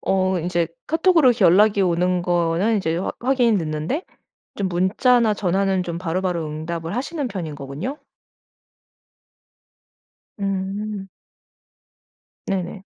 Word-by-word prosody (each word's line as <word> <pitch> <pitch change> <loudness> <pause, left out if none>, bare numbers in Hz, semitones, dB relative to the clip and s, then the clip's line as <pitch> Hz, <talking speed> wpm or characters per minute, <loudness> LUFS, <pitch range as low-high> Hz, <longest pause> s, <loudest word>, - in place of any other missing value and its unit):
어 190 -1 +1
인제 170 0 -1 0.2
카톡으로 320 -4 +4
연락이 200 +3 +5
오는 180 0 +1
거는 175 +5 +1
이제 165 -5 -1
화 180 - -2
확인이 245 -4 +3
됐는데 160 - -2 0.5
좀 195 -2 -1
문자나 215 +6 +3
전화는 190 0 +1
좀 170 -1 -4
바로바로 180 -1 -2
응답을 165 +3 -5
하시는 285 +3 -2
편인 175 -8 -5
거군요. 145 - -6 2.4
음. 195 +1 -3 1.4
네네. 190 0 -3
190 Hz, 225 characters per minute, -22 LUFS, 170-210 Hz, 2.4 s, 연락이